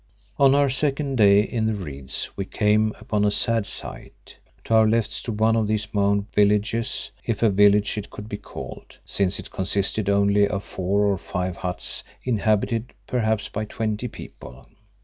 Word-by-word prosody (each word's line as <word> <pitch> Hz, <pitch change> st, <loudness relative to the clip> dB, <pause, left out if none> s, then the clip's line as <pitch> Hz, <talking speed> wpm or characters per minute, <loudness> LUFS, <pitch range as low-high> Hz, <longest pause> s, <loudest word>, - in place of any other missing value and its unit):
On 135 Hz, -1 st, +6 dB
our 140 Hz, 0 st, +4 dB
second 135 Hz, 0 st, -1 dB
day 100 Hz, -2 st, +6 dB
in 110 Hz, 0 st, -1 dB
the 110 Hz, -, 0 dB
reeds 70 Hz, -8 st, -5 dB
we 100 Hz, -, -2 dB
came 105 Hz, +2 st, +2 dB
upon 105 Hz, -2 st, -1 dB
a 105 Hz, -, +4 dB
sad 115 Hz, +1 st, +1 dB
sight. -, -, -6 dB, 0.2 s
To -, -, -2 dB
our 110 Hz, -1 st, +6 dB
left 115 Hz, 0 st, +1 dB
stood 110 Hz, -3 st, -4 dB
one 110 Hz, +1 st, +4 dB
of 110 Hz, -2 st, +1 dB
these 105 Hz, 0 st, -2 dB
mound 100 Hz, 0 st, +2 dB
villages, 105 Hz, +4 st, +1 dB
if 115 Hz, -1 st, -2 dB
a 110 Hz, -, +5 dB
village 105 Hz, +2 st, +4 dB
it 100 Hz, -, -8 dB
could 105 Hz, -, -9 dB
be 105 Hz, -, -5 dB
called, 105 Hz, -, -10 dB
since 100 Hz, 0 st, 0 dB
it -, -, -8 dB
consisted 100 Hz, +2 st, -1 dB
only 100 Hz, 0 st, +3 dB
of 100 Hz, -1 st, -3 dB
four 95 Hz, +2 st, -1 dB
or 100 Hz, -3 st, +1 dB
five 90 Hz, -2 st, -3 dB
huts 90 Hz, -1 st, -4 dB, 0.2 s
inhabited 110 Hz, 0 st, 0 dB
perhaps 110 Hz, -4 st, 0 dB
by 110 Hz, -, -4 dB
twenty 110 Hz, +2 st, -3 dB
people. 65 Hz, -, -11 dB
105 Hz, 170 wpm, -23 LUFS, 100-115 Hz, 0.2 s, On